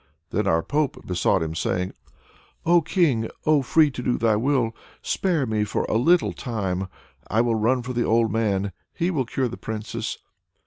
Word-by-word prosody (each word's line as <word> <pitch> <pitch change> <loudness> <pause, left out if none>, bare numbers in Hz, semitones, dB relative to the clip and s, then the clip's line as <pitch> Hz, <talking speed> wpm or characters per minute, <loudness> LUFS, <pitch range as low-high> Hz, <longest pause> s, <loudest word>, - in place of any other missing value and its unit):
Then 105 0 0
our 80 -3 +2
Pope 150 0 -1
besought 90 0 +1
him, 80 0 -3
crying 90 +3 -1 0.7
"O 170 +1 +5
King! 150 - +1 0.2
O 155 -2 +4
free 150 +2 +4
to 130 - -6
do 125 0 0
thy 115 -2 +2
will! 120 -1 +1 0.3
Spare 170 -8 0
me 110 -2 0
for 105 - -1
a - - -2
little 165 +10 +3
time! 95 -7 -3 0.4
I 110 - +2
will 120 -1 +1
run 120 +3 +1
for 125 +2 -4
the 120 - 0
old 115 0 +2
man, 100 -3 0 0.2
he 175 +2 0
will 140 -7 0
cure 130 +1 -1
the 120 - -7
Princess." 110 +1 -4
115 Hz, 180 wpm, -24 LUFS, 105-140 Hz, 0.7 s, O